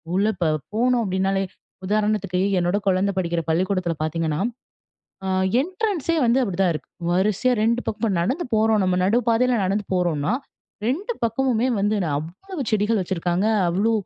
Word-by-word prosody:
உள்ள 200 +3 +2
ப - - +3 0.3
போனோம் 240 +1 +2
அப்டினாலே 190 +1 0 0.4
உதாரணத்துக்கு, 205 -3 0 0.2
என்னோட 175 +3 +1
குழந்தை 190 +1 +2
படிக்கிற 170 -2 0
பள்ளிக்கூடத்தில 180 0 0
பார்த்தீங்கன்னா, 160 0 -1 0.8
ஆ - - -2 0.3
என்ட்ரன்ஸ்சே 365 -1 -1
வந்து 240 +3 +3
அப்டி 195 -7 -2
தான் 175 -3 +3
இருக்கு. - - -7 0.2
வரிசையா 210 +7 +2
2 235 +2 +2
பக்கம் 215 +2 -4
இப்ப 225 - +2
நடந்து 265 - -1
போறோம் 220 -1 +3
நம்ம 185 -1 +2
நடு 220 +6 +3
பாதையில 245 +1 +3
நடந்து 200 +2 0
போறோன்னா, 170 -1 0 0.5
2 375 - -1
பக்கமுமே 245 +1 +1
வந்து 210 +1 +1
நா - - -1
அவ்வளவு 270 - -6
செடிகள் 215 +1 +2
வச்சிருக்காங்க. 180 +1 -1 0.2
அவ்ளோ 200 +6 +1
205 Hz, 150 wpm, -23 LUFS, 180-235 Hz, 0.8 s, ப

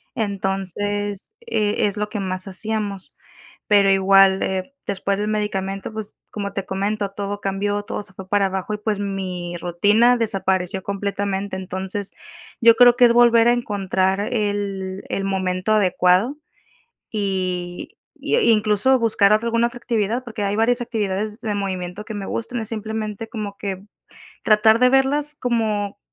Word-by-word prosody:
Entonces, 205 - -2
eh, 215 - 0
es 205 +1 -4
lo 210 0 -1
que 210 -1 -4
más 185 0 -3
hacíamos. 205 0 -4 0.5
Pero 200 -2 +5
igual, 195 0 +5
eh, 190 +8 -2
después 195 0 -1
del 210 - -2
medicamento, 195 -2 -2
pues, 215 -1 -6 0.2
como 200 -2 -4
te 195 -1 -3
comento, 200 +1 -2
todo 205 0 -5
cambió, 205 +1 -1
todo - - -4
se 200 -2 -7
fue 185 0 -10
para 205 -1 +3
abajo 190 +2 -3
y, - - -2
pues, 210 -1 -2
mi 185 -3 -4
rutina 205 +8 +3
desapareció 190 -4 -1
completamente. 200 -1 -2
Entonces, 190 +1 -4 0.5
yo 230 0 +7
creo 245 0 +7
que 250 - +3
es 235 - +7
volver 235 -1 +5
a - - +6
encontrar 195 -4 0
el 200 -3 -2
el 195 - -2
momento 190 +1 0
adecuado 190 +5 +3 0.7
y 185 -4 -3 0.3
y, - - 0
eh, 475 - +4
incluso, 215 +4 +3
buscar 215 -3 +3
otra 215 +2 +2
alguna 230 +1 +2
otra 240 0 -10
actividad, 230 +1 -1
porque 220 -3 -5
hay 200 0 0
varias 240 +3 +2
actividades 215 -1 -3
de 215 -2 -2
movimiento 190 0 -4
que 220 - -7
me 200 -2 -5
gustan, 235 +1 -3
es 220 - -5
simplemente 220 0 -4
como 210 -3 -5
que 195 -1 -4 0.6
tratar 220 +1 +5
de 250 0 +5
verlas 285 +3 +2
como, 215 -6 -1
205 Hz, 155 wpm, -21 LUFS, 195-220 Hz, 0.7 s, yo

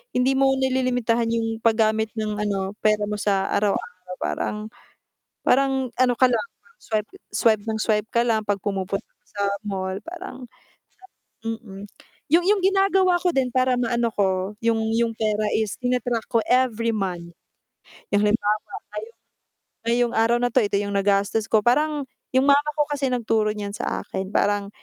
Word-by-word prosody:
hindi 255 +2 +3
mo 270 0 +4
nililimitahan 245 -3 +1
'yong 225 -1 -2
paggamit 220 -1 +2
ng, 215 -1 -2
ano, 195 -2 -1
pera 215 -1 +3
mo 210 - -2
sa 195 -2 +1
araw-araw 185 -3 -2
parang, - - -2 0.9
parang 265 -1 +2
ano 250 -1 +4
ka 260 - +4
lang 240 - +2 0.2
mag-swipe 225 - -4 0.2
swipe 220 -3 +3
nang 220 - 0
swipe 210 -1 +1
ka 235 -1 +3
lang 220 -3 0
'pag 205 -2 -1
pumupunta 195 -1 -2
ka - - -45
sa 200 - -2 0.2
mall, 190 -1 -3
parang 335 -8 -8 1.0
hirap 225 0 -3
mm. 195 -4 -11 0.5
'Yong 345 +2 +5
'yong 410 -2 +3
ginagawa 385 -2 +3
ko 360 - +1
din 255 -2 +1
para 255 0 +2
maano 235 -1 +1
ko, 190 0 0
'yong 230 -1 +2 0.2
'yong 230 0 +1
pera 215 -1 -1
is 215 -2 0
tina-track 245 -2 -1
ko 230 - +4
every 240 -3 +2
month. 180 -4 -3 0.8
Halimbawa 210 +1 +2 0.4
ngayong 220 +2 -7 0.7
ngayong 240 0 +2
araw 230 +1 +3
na 245 0 +1
ito, 255 - +5
ito 205 - -1
'yong 200 0 -3
nagastos 200 +2 +1
ko. 220 - +5
Parang, 295 +3 +2 0.3
'yong 260 +1 +3
mama 285 +1 +4
ko 295 - +4
kasi 285 -2 -1
nagturo 225 -3 +1
niyan 205 -1 -4
sa - - -3
akin, 190 0 -4
parang, 205 -1 +1
225 Hz, 160 wpm, -23 LUFS, 205-255 Hz, 1.0 s, Yong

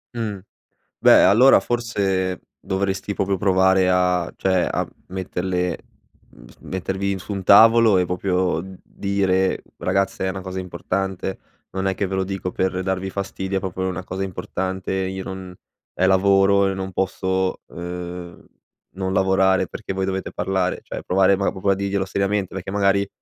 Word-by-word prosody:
Mh. 110 -4 -3 0.6
Beh, - - +7
allora 125 +5 +7
forse 95 -5 -1 0.2
dovresti 95 +1 -2
proprio 100 -1 0
provare 95 -1 +3
a 90 -1 +1
cioè, 95 -2 +1
a - - -1 0.2
metterle 90 -1 -2 0.8
mettervi 95 +1 -3
su 100 - -8
un 100 -2 -3
tavolo, 115 +1 +7
e 90 - +2
proprio 90 -1 0 0.2
dire: 95 -1 0 0.2
"Ragazze, 95 -1 0
è - - 0
una 95 0 -5
cosa 95 0 -5
importante, 95 +1 -3 0.3
non 95 0 -3
è 95 - +1
che 100 - -2
ve 95 - -3
lo 95 - +1
dico 95 -1 -4
per 95 0 -1
darvi 95 0 -2
fastidio; 95 0 -3
è - - +1
proprio 95 0 -5
una 95 0 -4
cosa 95 +1 -4
importante. 95 0 -4
Io 95 0 -2
non 95 -1 -7 0.4
ehm, 95 - +2
lavoro 95 +1 +4
e - - -1
non 95 0 -5
posso, 95 0 -1
uhm, 90 0 -7 0.5
non 95 0 -2
lavorare 95 0 +3
perché 95 - -6
voi 95 0 -1
dovete 95 0 -3
parlare," 95 -1 -1
cioè, - - -7
provare 95 +1 +3
ma 100 - 0
proprio 95 +1 -2
a 100 - +4
dirglielo 100 0 -1
seriamente, 100 0 -1
perché 95 0 -5
magari 100 0 +2
95 Hz, 155 wpm, -22 LUFS, 95-100 Hz, 0.8 s, Beh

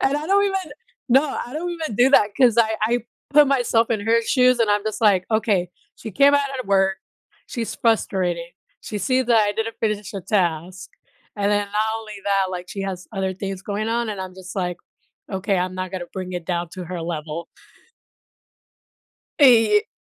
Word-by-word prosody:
And 270 +2 +2
I 300 +1 -4
don't 400 +1 +3
even 385 -6 -2 0.4
no, 265 +3 +5 0.2
I 245 - -11
don't 335 +4 -3
even 320 -9 -4
do 255 +2 +5
that, 210 -6 +5
'cause 245 -4 +4
I 220 -1 +3
I 235 +3 +2 0.3
put 295 0 +6
myself 240 -4 +2
in 220 -3 0
her 225 +3 +2
shoes, 250 +1 +3
and 230 - +2
I'm 205 0 +1
just 215 -1 -3
like, 200 -5 +4
"Okay. 205 -5 +1 0.3
She 220 - -8
came 280 +8 +5
out 285 -1 +2
of - - -8
work. 195 -1 +2 0.5
She's 235 -4 -4
frustrated. 185 -7 0 0.4
She 210 - -5
sees 255 +3 +1
that 235 -2 +4
I - - 0
didn't 225 +2 -3
finish 210 -2 -2
a 195 - -3
task," 180 -1 -1 0.5
and 205 0 0
then, 205 0 +1
not 210 - +2 0.2
only 215 -1 -9
that, 195 -2 +1
like, 180 0 -6
she 195 - -5
has 185 -2 -5
other 190 -2 -2
things 195 0 -5
going 210 +2 -3
on, 235 0 -1
and 205 -3 -4
I'm 185 -1 -7
just 185 0 -10
like, 180 -2 -2 0.5
"Okay, 195 +1 0
I'm 185 +1 -1
not 185 -1 -4
gonna 180 -2 -4
bring 185 -1 -5
it 175 -2 -4
down 175 -1 -2
to 185 -2 -7
her 175 0 -5
level." 165 0 -5 1.9
Eh, 250 - +6
ye 420 +1 +3
210 Hz, 200 wpm, -22 LUFS, 185-240 Hz, 1.9 s, put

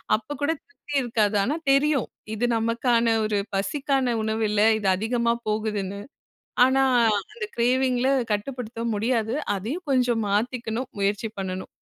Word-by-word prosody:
அப்போ 225 +7 -5
கூட 290 +2 +2
திருப்தி 340 -3 -12
இருக்காது. 220 -4 +1
ஆனா 275 +9 0 0.2
தெரியும் 275 -2 +3 0.3
இது 230 +3 0
நமக்கான 230 +1 +1 0.2
ஒரு 215 -1 0 0.2
பசிக்கான 270 +3 0
உணவு 220 +1 -1
இல்ல. 210 0 +1 0.2
இது 200 - -2
அதிகமா 235 +2 +1 0.2
போகுதுன்னு. 210 -2 -2 0.6
ஆனா, 265 +1 +3 0.5
அந்த 450 -1 -4
கிரேவிங்கில 255 +1 +2 0.2
கட்டுப்படுத்தவும் 230 +1 -3
முடியாது. 225 +1 0 0.2
அதையும் 275 - -5
கொஞ்சம் 245 -4 +2
மாற்றிக்கணும் 230 +3 -1
முயற்சி 200 +2 0
பண்ணணும். 185 -1 -4
235 Hz, 125 wpm, -25 LUFS, 215-260 Hz, 0.6 s, தெரியும்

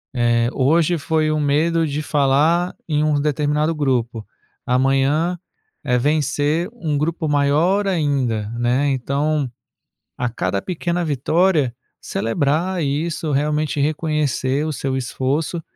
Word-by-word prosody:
eh, 120 -1 +2
hoje 165 +5 +2
foi 155 0 0
um 155 - 0
medo 160 +3 +2
de 145 +1 -2
falar 150 +5 +2
em 150 -1 +1
um 150 -2 +1
determinado 150 +2 0
grupo, 120 -6 -1 0.4
amanhã 135 +7 +2 0.5
é 125 - +1
vencer 150 - 0
um 155 -10 -2
grupo 160 +2 -1
maior 155 +8 +2
ainda, 135 - 0
né. 125 +4 +1
Então, 140 +1 -1 0.7
a 125 - -1
cada 100 -4 -2
pequena 175 0 -2
vitória, 150 -1 +1 0.3
celebrar 155 +9 -1
isso, 155 +2 -2
realmente 150 +1 0
reconhecer 150 -2 0
o 155 - -2
seu 135 -1 -2
esforço, 140 +6 -2
150 Hz, 120 wpm, -20 LUFS, 135-160 Hz, 0.7 s, eh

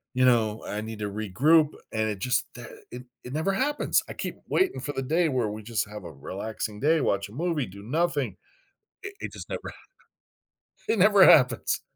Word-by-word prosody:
you 130 0 +4
know, 110 -3 +2
I 105 - -3
need 110 0 -7
to 105 - -3
regroup 130 - +3 0.2
and 110 0 0
it 105 -3 -4
just, 125 +5 +1
eh, 120 - -8 0.3
it 125 +1 -8 0.2
it 125 - -8
never 160 +6 0
happens! 290 +8 +1
I - - -5
keep - - -5
waiting 380 0 +1
for 145 - -4
the 135 - -3
day 160 +5 +2
where 125 -6 0
we 105 +1 -7
just 115 -1 -2
have 105 -1 -8
a 85 - -8
relaxing 105 +8 -6
day, 155 +4 +3
watch 100 -4 0
a - - -14
movie, 160 -1 -1
do 100 +2 -12
nothing. 145 - -1 0.7
It 395 0 -6
it - - -6
just - - -9
never - - -5
ha - - -11 1.1
it 220 - +1
never 200 0 +7
happens. 125 -9 +5
125 Hz, 200 wpm, -26 LUFS, 105-160 Hz, 1.1 s, never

